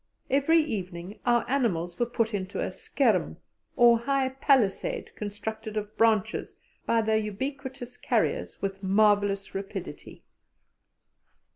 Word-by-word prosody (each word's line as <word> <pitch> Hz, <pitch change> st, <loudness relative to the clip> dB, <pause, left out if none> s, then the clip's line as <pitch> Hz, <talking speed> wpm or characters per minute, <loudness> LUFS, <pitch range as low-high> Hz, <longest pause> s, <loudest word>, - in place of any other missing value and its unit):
Every 285 Hz, +5 st, +4 dB
evening 190 Hz, -, -5 dB
our 240 Hz, -1 st, +3 dB
animals 185 Hz, -10 st, 0 dB
were 240 Hz, -, +2 dB
put 230 Hz, -2 st, -1 dB
into 190 Hz, -1 st, -3 dB
a -, -, -1 dB
"skerm," -, -, 0 dB, 0.4 s
or 235 Hz, -1 st, +6 dB
high 270 Hz, +2 st, +1 dB
palisade, 260 Hz, -6 st, +1 dB
constructed 215 Hz, +1 st, -5 dB
of 210 Hz, 0 st, -4 dB
branches 220 Hz, -3 st, +1 dB, 0.3 s
by 230 Hz, -1 st, +3 dB
the 220 Hz, 0 st, +2 dB
ubiquitous 255 Hz, +3 st, -5 dB
carriers -, -, -1 dB
with 195 Hz, 0 st, -3 dB
marvellous 200 Hz, 0 st, +2 dB
rapidity. 195 Hz, 0 st, -7 dB
220 Hz, 115 wpm, -27 LUFS, 200-245 Hz, 0.4 s, or